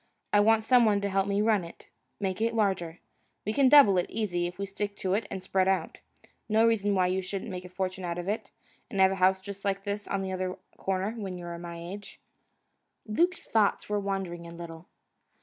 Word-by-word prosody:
I 205 - +6
want 220 +1 +4
some 250 0 +6
one 210 -3 +3
to 200 - -1
help 195 0 +1
me 200 +1 +1
run 215 -4 +3
it, 170 - -12 0.3
make 195 0 -2
it 230 0 +1
larger. 190 -6 0 0.5
We 215 - -1
can 275 0 +5
double 235 -10 +8
it, 175 - -2
easy, 180 -6 -1
if 180 +1 -8
we 200 - -2
stick 200 +1 -4
to 185 -1 -1
it 205 +1 0
and 190 -1 -5
spread 190 0 +1
out. 190 -4 0 0.5
No 220 +1 +4
reason 205 -3 +2
why 185 -1 +3
you 185 +1 0
shouldn't 195 +3 -5
make 180 0 -6
a - - -9
fortune 185 0 -3
out 170 -1 -3
of 175 +1 -5
it, 210 +3 -2 0.4
and 195 - -4
have 190 0 +6
a - - -1
house 190 +1 +4
just 200 +1 -9
like 195 0 -1
this 205 0 -3
on 195 -1 -1
the 190 - -3
other 185 0 -3 0.2
corner, 190 +2 -1
when 200 -5 -5
you're 175 -1 -6
my 170 0 -7
age." 190 +5 -8 0.9
Luke's 345 +12 +1
thoughts 215 -2 +1
were 210 0 +1
wandering 190 -4 -3
a 170 - -10
little. 165 0 -9
195 Hz, 220 wpm, -28 LUFS, 185-210 Hz, 0.9 s, double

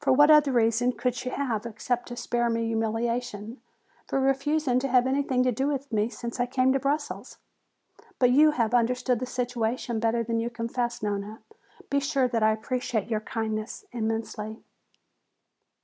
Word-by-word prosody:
What 295 +3 +6
other 300 -2 +6
reason 235 +1 +2
could 250 0 -1
she 250 +1 -4
have, 245 -6 -2
except 240 +2 -3
to 240 - -6
spare 240 0 0
me 230 0 0
humiliation, 225 0 -2 0.5
for - - 0
refusing 270 0 +1
to 275 - -1
have 250 -1 +4
anything 265 -1 +1
to 255 - +2
do 265 +4 -1
with 280 -2 -3
me 215 +1 +1
since 235 0 -6
I 245 - +1
came 255 +1 +2
to 270 - +1
Brussels? 285 +3 -3 0.8
But 250 -1 +4
you 300 +4 +6
have 235 -6 0
understood 245 0 +2
the 255 - -3
situation 245 -1 -2
better 230 +1 +1
than 230 0 -1
you 230 +1 -1
confess, 240 0 -3
Nona. 205 +1 -3 0.5
Be 280 - +3
sure 275 -2 +1
that 230 -2 0
I 215 0 +5
appreciate 225 0 -2
your 215 - +1
kindness 220 - -4
immensely." 220 -1 -4
240 Hz, 165 wpm, -27 LUFS, 225-260 Hz, 0.8 s, What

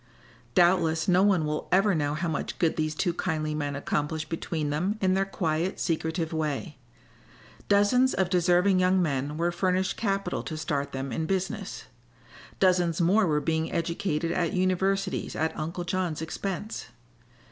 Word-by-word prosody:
Doubtless 170 -3 +3
no 180 0 +4
one 190 -5 +3
will 150 0 -3
ever 195 +2 +4
know 145 -2 0
how 170 +3 -2
much 160 - -3
good 165 -2 +1
these 155 -1 -1
two 175 +2 0
kindly 155 -4 -2
men 145 -2 -2
accomplished 150 +2 -2
between 160 -2 -2
them 180 +8 -1
in 185 -2 +2
their 195 0 +1
quiet, 170 -1 -1
secretive 160 0 -1
way. 155 -1 -3 0.9
Dozens 205 +6 +4
of 190 - +1
deserving 180 +1 +3
young 185 +1 +3
men 145 -3 -1
were 170 +1 +1
furnished 185 +1 0
capital 195 -2 -1
to 155 - -6
start 145 -3 -2
them 135 0 -4
in 160 - -2
business; 190 0 -3 0.8
dozens 180 -3 +3
more 190 +4 +4
were 150 -2 +2
being 160 +1 -1
educated 165 -1 -1
at 170 -2 0
universities 190 +1 0
at 160 +1 -1
Uncle 165 +3 -4
John's 175 -3 -2
expense. 195 - -4
170 Hz, 155 wpm, -27 LUFS, 155-185 Hz, 0.9 s, no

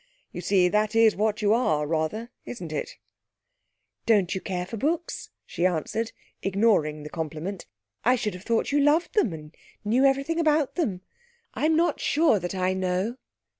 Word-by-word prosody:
You - - -6
see, 185 -3 +3
that 210 +3 +1
is 225 -1 +5
what 215 +1 0
you 205 +1 +4
are, 155 -11 +1
rather, 165 +10 -2
isn't 180 -10 -7
it?' 150 - -4 1.1
'Don't 200 -5 +3
you 190 - -3
care 180 -2 -3
for 210 - -7
books?' 325 +9 -2 0.2
she 170 - -4
answered, 185 +7 -2 0.3
ignoring 190 -7 +1
the 150 - -7
compliment. 165 +4 -5 0.4
'I 250 +3 +4
should 220 -5 -2
have 180 - -9
thought 230 +4 0
you 290 - +3
loved 295 +4 +3
them, 415 - +2
and 155 -1 -9 0.3
knew 235 +6 +3
everything 275 +5 +2
about 305 -3 +2
them. 210 - -2 0.5
I'm 315 +1 +1
not 335 +2 +2
sure 300 -8 +3
that 175 +2 -4
I 185 0 +1
know.' 190 +5 -1
210 Hz, 170 wpm, -26 LUFS, 180-255 Hz, 1.1 s, is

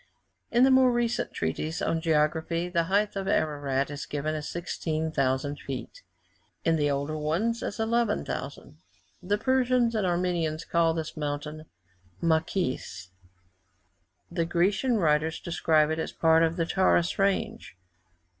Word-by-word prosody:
In 240 +1 +4
the 265 - +6
more 260 -1 +6
recent 240 -1 0
treatises 120 - -3
on 165 - 0
geography, 160 +2 +1
the 170 -2 +1
height 205 +3 +1
of 195 -1 -3
Ararat 145 -4 0
is 145 0 -6
given 150 +1 -2
as 155 -1 -4
16,000 155 -5 -2
feet; 140 - -7 0.6
in 165 - +3
the 145 -2 +1
older 140 +2 -2
ones, 170 +10 -1
as 205 - -4
11,000. 225 - -2 0.4
The 200 +3 0
Persians 250 0 +2
and 210 -4 0
Armenians 175 -3 -1
call 165 -1 +2
this 160 -1 -4
mountain 150 +1 -4 0.5
Macis; 160 - -1 1.2
the 165 - 0
Grecian 195 +8 +1
writers 160 -3 +1
describe 160 -2 +2
it 160 - -1
as - - -3
a - - -26
part 160 0 +4
of 165 0 +2
the 170 -2 0
Taurus 175 -1 +2
range. 195 - -1
165 Hz, 135 wpm, -27 LUFS, 150-195 Hz, 1.2 s, the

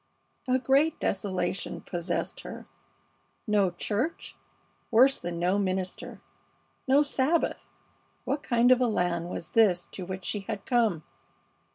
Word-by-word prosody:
A 255 0 +3
great 275 +4 +2
desolation 190 -2 -2
possessed 175 0 -3
her. - - -9 0.8
No 205 -4 +3
church! 210 - -3 0.5
Worse 255 +4 +5
than 175 0 -5
no 180 +4 +1
minister! 185 -1 -3 0.7
No 275 +3 +5
Sabbath! 290 +3 0 0.6
What 285 - -1
kind 240 -1 +3
of 255 0 +5
a 250 - +3
land 175 -5 -1
was 170 - -6
this 190 -6 +3
to 190 - -6
which 185 0 -6
she 210 - -1
had 195 0 -6
come? 225 - +1
205 Hz, 130 wpm, -28 LUFS, 180-255 Hz, 0.8 s, Worse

